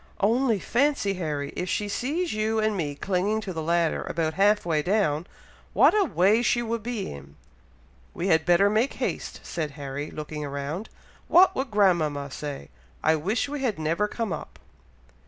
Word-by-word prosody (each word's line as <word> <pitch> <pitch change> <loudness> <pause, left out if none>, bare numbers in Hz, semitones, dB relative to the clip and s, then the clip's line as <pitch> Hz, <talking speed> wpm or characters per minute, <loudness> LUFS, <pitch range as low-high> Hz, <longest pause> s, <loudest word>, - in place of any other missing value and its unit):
"Only 230 +2 +2
fancy, 245 -1 +1
Harry, 150 -6 -3
if 180 - -3
she 210 - -1
sees 295 - -2
you 215 +1 0
and 215 -1 +1
me 150 -6 -2
clinging 195 +6 0
to 195 -3 -5
the 160 - -3
ladder, 170 0 +1
about 160 -1 -1
half 205 +2 +3
way 160 -3 +1
down! 175 -3 +1 0.5
what - - +6
a 410 -2 +4
way 210 - +3
she 240 0 +1
would 230 0 -2
be 230 -3 -4
in!" 70 0 -12 0.8
"We 175 - -3
had 160 -3 +4
better 175 +3 +4
make 220 +6 +1
haste," - - -4
said 160 -3 -3
Harry, 145 +1 -5
looking 150 0 -6
around. 145 +8 -4 0.4
"What 365 +2 +6
would 265 0 -2
grandmama 160 -9 +2
say! 140 - -6 0.3
I 160 +1 +4
wish 195 - -1
we 290 -1 -4
had 240 -6 0
never 165 +6 0
come 220 -3 -3
up!" - - -8
190 Hz, 175 wpm, -26 LUFS, 155-220 Hz, 0.8 s, what